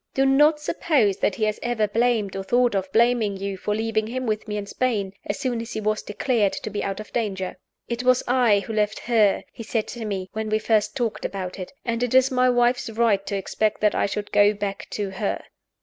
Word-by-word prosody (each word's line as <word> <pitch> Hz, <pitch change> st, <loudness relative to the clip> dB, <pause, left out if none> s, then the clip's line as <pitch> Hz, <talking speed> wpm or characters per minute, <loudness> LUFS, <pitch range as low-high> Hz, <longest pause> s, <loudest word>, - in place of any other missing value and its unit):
Do 270 Hz, -, +3 dB
not 295 Hz, +3 st, +5 dB
suppose 290 Hz, -, +1 dB
that 200 Hz, -, 0 dB
he 220 Hz, -, -3 dB
has 215 Hz, 0 st, 0 dB
ever 240 Hz, -3 st, 0 dB
blamed 225 Hz, -2 st, +1 dB
or 195 Hz, -, -2 dB
thought 245 Hz, +3 st, +2 dB
of 190 Hz, -1 st, -2 dB
blaming 230 Hz, -3 st, +2 dB
you 195 Hz, 0 st, -3 dB
for 210 Hz, +2 st, -2 dB
leaving 220 Hz, 0 st, -1 dB
him 255 Hz, +2 st, -3 dB
with 215 Hz, -1 st, -2 dB
me 210 Hz, 0 st, -3 dB
in 205 Hz, -, -4 dB
Spain, 205 Hz, -4 st, -1 dB
as 205 Hz, -, -2 dB
soon 245 Hz, -3 st, -2 dB
as 230 Hz, -, -7 dB
he -, -, -2 dB
was 215 Hz, 0 st, 0 dB
declared 210 Hz, -1 st, 0 dB
to 215 Hz, -, -5 dB
be 205 Hz, -, -3 dB
out 195 Hz, 0 st, -3 dB
of 215 Hz, -, -10 dB
danger. 195 Hz, -5 st, -2 dB, 0.3 s
'It 235 Hz, 0 st, -3 dB
was 255 Hz, 0 st, +3 dB
I 240 Hz, -5 st, +4 dB
who 220 Hz, -, -6 dB
left 210 Hz, -1 st, 0 dB
her,' 220 Hz, -5 st, +3 dB
he -, -, -9 dB
said 225 Hz, 0 st, -2 dB
to 240 Hz, -1 st, -6 dB
me, 195 Hz, -3 st, -3 dB
when 220 Hz, 0 st, -3 dB
we 215 Hz, -, +2 dB
first 215 Hz, -1 st, +1 dB
talked 240 Hz, -5 st, -2 dB
about 190 Hz, -1 st, -4 dB
it; 185 Hz, -, -6 dB
'and 235 Hz, -1 st, -1 dB
it 245 Hz, 0 st, 0 dB
is 260 Hz, +1 st, +5 dB
my 255 Hz, 0 st, +3 dB
wife's 245 Hz, -1 st, +2 dB
right 220 Hz, -3 st, +2 dB
to 200 Hz, -, -2 dB
expect 215 Hz, +2 st, -1 dB
that 210 Hz, -1 st, +3 dB
I -, -, +1 dB
should 205 Hz, +1 st, -4 dB
go 205 Hz, 0 st, +5 dB
back 200 Hz, -1 st, -4 dB
to 205 Hz, -2 st, -3 dB
her. 195 Hz, +1 st, -2 dB
215 Hz, 235 wpm, -24 LUFS, 205-240 Hz, 0.3 s, not